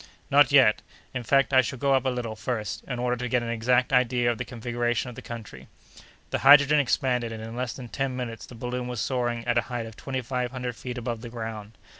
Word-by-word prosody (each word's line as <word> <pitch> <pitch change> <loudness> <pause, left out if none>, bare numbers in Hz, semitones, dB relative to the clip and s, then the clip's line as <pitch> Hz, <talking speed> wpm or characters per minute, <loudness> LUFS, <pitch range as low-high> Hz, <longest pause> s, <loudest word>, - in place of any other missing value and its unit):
"Not 145 +1 +6
yet. 130 -6 +6 0.3
In 125 - -2
fact, 135 +4 +2
I 130 - +7
shall 130 +2 -4
go 140 +2 +2
up 135 0 +2
a - - +3
little, 120 -3 -3
first, 110 -3 -4
in 125 - -4
order 125 0 0
to 125 +1 -4
get 125 0 +1
an 115 - -4
exact 125 +3 +1
idea 125 -1 +3
of 120 - -5
the - - -1
configuration 120 0 -2
of - - -13
the - - -8
country." 115 -3 -9 0.6
The - - 0
hydrogen 145 +2 +7
expanded, 125 -3 +1
and 110 -1 -6
in 115 +1 -7
less 125 -1 -2
than 125 -2 -8
ten 135 +1 -2
minutes 120 -3 -5
the 125 - -12
balloon 125 +2 -4
was 125 -2 -4
soaring 120 -2 -1
at 120 -1 +2
a 115 - -6
height 120 -2 -3
of 110 -1 -10
twenty 130 +1 -4
five 125 0 -2
hundred 125 -2 -5
feet 125 +1 -6
above 120 -2 -4
the 120 - -7
ground. 110 -2 -7
125 Hz, 240 wpm, -26 LUFS, 115-130 Hz, 0.6 s, I